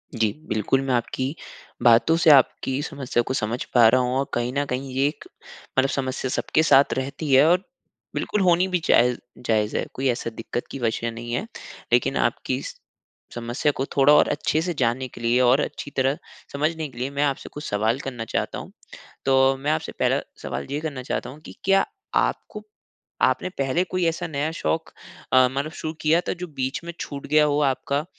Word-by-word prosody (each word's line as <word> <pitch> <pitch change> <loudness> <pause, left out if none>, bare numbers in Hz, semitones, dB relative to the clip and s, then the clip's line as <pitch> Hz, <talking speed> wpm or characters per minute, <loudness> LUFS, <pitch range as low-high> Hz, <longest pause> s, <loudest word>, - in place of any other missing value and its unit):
जी, 110 -2 +2 0.2
बिल्कुल, 110 +5 +1
मैं 135 -2 -1
आपकी 130 +4 -1 0.5
बातों 120 +7 +5
से 170 -2 +4
आपकी 135 0 +4
समस्या 135 -6 -1
को 130 - -3
समझ 115 +1 -2
पा 120 -3 +7
रहा 130 +1 +4
हूँ, 125 0 -1
और 140 - 0
कहीं 120 +1 -1
न 145 0 0
कहीं 130 +1 -4
ये 135 +2 +2
एक 150 - -6 0.5
मतलब 135 +1 +4
समस्या 130 -1 -2
सबके 160 +4 +1
साथ 140 -2 +5
रहती 140 +2 -3
है 135 +3 +7
और 180 +2 +3 0.5
बिल्कुल 210 - -1
होनी 180 0 +4
भी 180 -1 0
जायज़ 125 0 +4 0.3
जायज़ 110 -1 +1
है, - - -1
कोई 135 +1 -1
ऐसा 120 -1 -1
दिक़्क़त 115 +2 -5
की 135 - -6
वजह 115 0 -1
नहीं 120 +1 -6
है। 195 - -1 0.5
लेकिन - - +3
आपकी - - 0
इस - - -7 0.6
समस्या 120 +5 0
को 135 - 0
थोड़ा 140 +2 +6
और 150 - +6
अच्छे 155 +1 0
से 175 0 -2
जानने 130 -1 0
के 120 - -13
लिए 120 +2 +2
और 125 +3 +5
अच्छी 145 - -5
तरह 135 +2 +2 0.4
समझने 155 +2 -1
के 120 - -17
लिए, 130 +3 -2
मैं 140 +1 -1
आपसे 140 -2 -1
कुछ 150 - -7
सवाल 110 +5 +1
करना 125 -5 -5
चाहता - - -2
हूँ। - - -10 0.5
तो 135 0 +4
मैं 145 +3 -1
आपसे 155 - -2
पहला - - +2 0.2
सवाल - - -4
ये 145 - -1
करना 140 -5 -5
चाहता 125 - -3
हूँ 145 +4 -11
कि - - -10
क्या 195 +1 +4 0.3
आपको - - -1 0.6
आपने 185 - +2
पहले 135 +7 +1
कोई 185 -1 -1
ऐसा 170 +2 -2
नया 150 +1 -2
शौक़ 165 -1 -2 0.4
अ, 130 0 +7
मानो 140 +3 -2
शुरू 155 0 -5
किया 160 +3 +3
था - - +1
जो - - -4
बीच 135 +1 -3
में 170 0 -6
छूट 140 -1 -6
गया 150 +1 +4
हो 145 0 +1
आपका? 140 +2 0
135 Hz, 200 wpm, -24 LUFS, 125-155 Hz, 0.6 s, पा